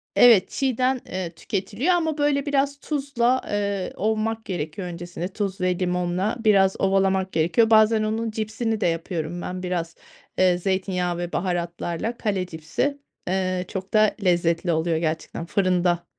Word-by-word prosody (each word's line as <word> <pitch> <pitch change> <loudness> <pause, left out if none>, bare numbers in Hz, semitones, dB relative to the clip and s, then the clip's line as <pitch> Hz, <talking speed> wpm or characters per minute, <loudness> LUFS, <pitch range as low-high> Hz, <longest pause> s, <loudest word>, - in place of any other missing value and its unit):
Evet, 225 -6 +7
çiğden, 260 -1 0
eee, 185 -2 -4
tüketiliyor 210 - -1
ama 320 -3 0
böyle 290 -1 +1
biraz 280 0 0
tuzla, 265 -4 0
eee, 200 -2 -2
ovmak 220 +2 -1
gerekiyor 175 +1 -4
öncesinde. 175 0 -5
Tuz 195 -1 -4
ve 180 0 +1
limonla 180 +3 0
biraz 195 -4 +4
ovalamak 190 -1 +2
gerekiyor. 170 +8 +3
Bazen 220 0 +5
onun 220 +1 -1
cipsini 220 0 -2
de - - +3
yapıyorum 165 0 -3
ben 185 0 -5
biraz, 170 -2 -3 0.4
eee, 185 -1 +4
zeytinyağı 180 -1 -1
ve 175 0 -4
baharatlarla. 175 +4 -2
Kale 195 -4 -1
cipsi, 165 - -2 0.3
eee, 185 -1 0
çok 190 +1 -6
da 215 -1 +4
lezzetli 170 -1 +2
oluyor 160 0 +1
gerçekten, 160 +1 -3
fırında 180 -2 +1
190 Hz, 140 wpm, -24 LUFS, 175-220 Hz, 0.4 s, Evet